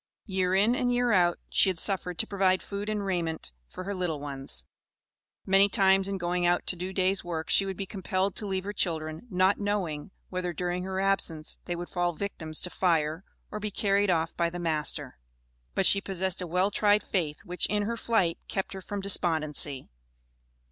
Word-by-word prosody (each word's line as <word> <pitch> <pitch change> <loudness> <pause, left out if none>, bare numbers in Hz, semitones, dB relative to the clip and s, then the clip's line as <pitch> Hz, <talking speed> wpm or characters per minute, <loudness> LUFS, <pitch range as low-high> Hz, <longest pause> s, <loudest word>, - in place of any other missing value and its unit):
Year 185 -2 0
in 210 +5 +4
and 250 0 +1
year 245 0 +2
out 175 -4 +4
she - - +5
had 185 - -2
suffered 180 -1 +1
to - - +1
provide 190 -3 +1
food 200 +1 -5
and 210 -2 -2
raiment 170 - -2 0.2
for 185 - -8
her 200 +2 -3
little 180 -5 -2
ones. 135 - -4 0.8
Many 195 +1 +5
times 195 0 +4
in 195 0 -2
going 175 0 -1
out 175 0 +2
to - - +2
do 180 +2 -5
days' 190 0 +1
work 165 -2 -3
she 195 - +5
would 190 - -4
be 195 - -3
compelled 190 0 -2
to 210 - -1
leave 190 -1 -2
her 205 +1 -4
children, 160 +1 -2
not 185 0 +3
knowing 200 -6 -2 0.2
whether 180 -1 -3
during 180 +2 -2
her 190 0 -3
absence 190 -5 0
they 175 - -2
would 175 +1 -5
fall 175 -1 0
victims 160 -4 0
to 180 - 0
fire, 160 -1 +1 0.3
or 210 - -4
be 210 0 -3
carried 200 0 +1
off 165 -2 +1
by 170 -1 +1
the 175 - -6
master. 155 - -2 0.6
But 195 - +2
she 200 - +5
possessed 190 -1 -2
a 180 - -4
well 180 +4 +1
tried 205 +1 +3
faith, 160 -6 -2
which 180 +1 +1
in 210 -1 0
her 230 +3 -2
flight 225 -7 +1
kept 195 0 -3
her 190 - -7
from 200 +2 -5
despondency. 155 -7 +1
185 Hz, 195 wpm, -28 LUFS, 170-200 Hz, 0.8 s, she